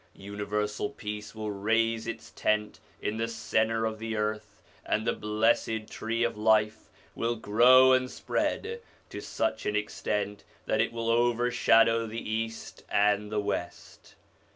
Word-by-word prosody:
Universal 105 +3 -3
peace 105 -5 -7
will 110 -1 -4
raise 115 +3 0
its 115 - -6
tent 105 -1 -1 0.2
in 105 - -2
the 115 +1 -1
centre 115 -1 0
of 110 -1 -3
the 115 0 -3
earth, 105 0 -3 0.2
and 110 - -1
the - - +2
Blessed 110 +1 0
Tree 115 +1 -2
of 120 - 0
Life 110 0 +2 0.2
will 115 +1 -1
grow 125 +4 +6
and 130 0 +2
spread 465 - -2 0.3
to - - -6
such 330 - -2
an 105 - 0
extent 105 -1 -2 0.2
that - - +1
it - - 0
will 115 0 -1
overshadow 115 -1 +3
the 115 +1 -5
East 115 +1 -4
and 105 0 +2
the 105 - 0
West. 100 -4 -5
110 Hz, 145 wpm, -28 LUFS, 105-115 Hz, 0.3 s, grow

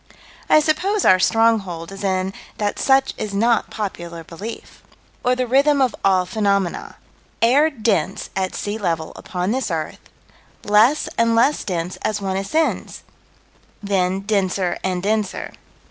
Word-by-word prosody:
I 310 - +6
suppose 380 +7 0
our 185 - +6
stronghold 195 -6 +1
is 195 +1 -8
in 190 0 0 0.2
that 205 -1 -2
such 270 0 +3
is 205 -2 -4
not 230 +3 +2
popular 170 -5 -5
belief 195 +8 -9 0.4
Or 250 +1 +2
the 255 0 -1
rhythm 280 +4 +3
of 260 -3 +2
all 185 -2 +3
phenomena: 200 -2 -1 0.4
Air 275 +7 +4
dense 210 - -1
at 190 -1 -2
sea 210 +2 -3
level 165 -5 -2
upon 180 0 -3
this 260 0 -1
earth 160 -3 -3 0.6
less 215 +8 +4
and 230 0 +3
less 270 +6 +3
dense 180 -2 -3
as 215 - -2
one 190 -1 -2
ascends 250 +12 -1 0.8
then 190 -1 0
denser 195 -3 0
and 185 -1 -2
denser. 210 -1 -1
200 Hz, 140 wpm, -21 LUFS, 185-230 Hz, 0.8 s, I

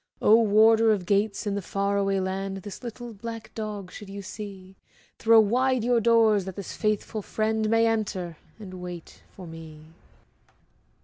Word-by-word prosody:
Oh, 220 +2 +6
Warder 220 +1 +5
of 195 -4 0
Gates, 200 +2 0
in 205 - -1
the 200 - -2
far 200 +2 -1
away 195 -1 +1
land, 195 0 -3
This 205 - -8
little 240 0 -7
black 225 +1 -8
dog 210 -4 -6
should 205 0 -10
you 200 0 -7
see, 195 -2 -9 0.4
Throw 225 0 +6
wide 250 +3 +2
your 240 -1 +2
doors 220 -4 +4
that 190 -2 -7
this 200 - -7
faithful 215 0 -1
friend 220 +1 -1
May 225 +1 +4
enter, 200 -7 -2 0.2
and 185 -4 -9
wait 175 -2 -9
for 185 - -10
me. 160 -1 -12
205 Hz, 165 wpm, -26 LUFS, 190-225 Hz, 0.4 s, Oh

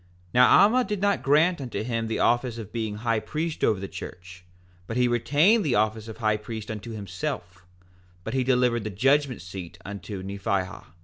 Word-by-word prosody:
4:18 90 - -31 0.3
Now 125 +1 +7
Alma 245 +5 +4
did 210 -4 -3
not 200 +1 +1
grant 155 +4 +3
unto 120 -4 -4
him 115 -1 -2
the 110 - -2
office 120 0 +1
of 110 -4 -8
being 110 -3 -2
high 115 +1 0
priest 155 +6 -4
over 105 - +3
the 100 - -5
church, 90 0 -9 0.4
but 115 - -3
he 125 0 +4
retained 145 - +3
the 140 -7 +1
office 110 +1 0
of 110 - -8
high 110 -2 +1
priest 110 0 -7
unto 110 +2 -7
himself; 90 -3 -5 0.6
but - - -5
he 130 -1 +1
delivered 125 -3 +2
the 110 - -3
judgment 135 - +1
seat 90 -1 -8
unto 100 -1 -6
Nephihah. 100 -1 -3
115 Hz, 190 wpm, -26 LUFS, 100-130 Hz, 0.6 s, Now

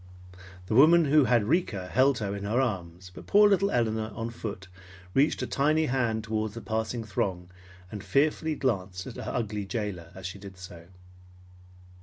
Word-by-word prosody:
The 110 - -3
woman 160 +7 +6
who 145 0 +4
had 120 -2 +3
Rika 105 - 0
held 130 +6 +3
her 100 -2 -3
in 100 - -6
her 110 +5 0
arms, 90 -7 -3
but - - -12
poor 210 +1 +6
little 200 0 +3
Elinor, 110 - 0
on 115 +1 -4
foot, 105 -5 -7 0.5
reached 140 +3 +2
a - - 0
tiny 155 +3 +1
hand 120 -5 0
toward 110 -1 -2
the 115 - -7
passing 110 +1 -3
throng, 90 -4 -3 0.4
and 105 -2 -7
fearfully 150 - +1
glanced 95 - -2
at - - -8
her - - -5
ugly 105 -3 -2
jailer 100 -6 -4
as 95 -1 -9
she 95 +1 -6
did 95 -1 -11
so. 85 -2 -11
110 Hz, 175 wpm, -28 LUFS, 95-135 Hz, 0.5 s, woman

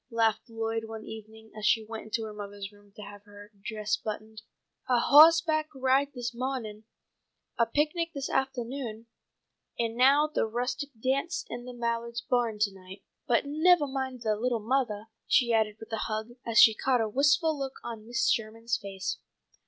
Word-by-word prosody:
laughed 225 0 +1
Lloyd 225 0 -3
one 220 0 -8
evening 220 0 -11
as 215 - -8
she 220 +1 +3
went 225 0 -7
into 220 +1 -2
her 215 -1 -6
mother's 205 -1 -7
room 205 0 -21
to 210 - -9
have 205 0 -11
her 205 0 -14
dress 210 -1 -1
buttoned. 215 0 -6 0.5
"A 250 - +4
hawse 320 +6 +8
back 310 -2 0
ride 265 +2 +2
this 240 -1 -4
mawning, 235 -4 -4 0.7
a 230 - +4
picnic 305 +6 0
this 280 -3 -4
aftahnoon, 245 -3 -3 0.7
and 230 -1 -1
now 275 +4 +5
the 305 -6 -1
rustic 250 +6 -3
dance 275 +8 -1
in 240 0 -6
the 250 - -8
Mallards' 235 0 -3
barn 240 -3 +1
to 205 -2 +2
night. 190 +1 -13 0.2
But 235 - +3
nevah 310 +2 +4
mind, 265 -3 -4
little 225 +3 0
mothah," 220 -2 -1 0.2
she 240 -3 +3
added 215 -2 +2
with 220 +1 -10
a - - 0
hug, 215 +1 -3
as 230 -1 -2
she 220 - +9
caught 255 +3 +1
a 225 - +1
wistful 290 - +3
look 270 -2 -4
on 225 -2 -7
Mrs. 245 +2 +1
Sherman's 225 +1 -2
face. 195 -2 -4
230 Hz, 175 wpm, -29 LUFS, 215-265 Hz, 0.7 s, she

